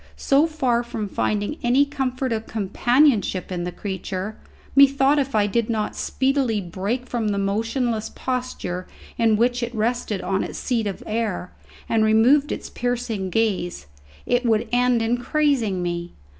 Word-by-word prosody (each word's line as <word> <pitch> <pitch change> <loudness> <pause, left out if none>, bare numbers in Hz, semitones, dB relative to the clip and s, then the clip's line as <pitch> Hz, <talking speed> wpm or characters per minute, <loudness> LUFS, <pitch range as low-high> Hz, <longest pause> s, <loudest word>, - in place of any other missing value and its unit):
So 285 +4 +3
far 260 -7 +1
from 225 -3 -4
finding 210 +8 -1
any 250 +4 +4
comfort 265 -2 -2
of 220 0 -4
companionship 220 -1 +2
in 175 -1 -2
the 180 - -3
creature, 190 +2 -5 0.4
methought 275 +1 +5
if 275 -3 -1
it 205 -1 +2
did 235 0 0
not 220 -2 -1
speedily 265 -4 0
break 200 +7 -3
from 235 -3 -2
the 205 -1 0
motionless 220 +3 -1
posture 250 -8 -3 0.3
in 225 -2 +4
which 245 +2 +2
it 235 0 -3
rested 220 -2 -1
on 190 +1 0
its - - -6
seat 230 -4 -1
of 195 - -5
air, 215 -5 -2 0.4
and 225 -1 +2
remove 240 +7 +4
its - - -4
piercing 240 -5 -2
gaze, 185 - -1 0.4
it 245 0 +1
would 225 -1 +2
end 245 -1 +3
in 240 +2 +1
crazing 245 - +1
me. 175 0 -3
230 Hz, 155 wpm, -23 LUFS, 205-250 Hz, 0.4 s, methought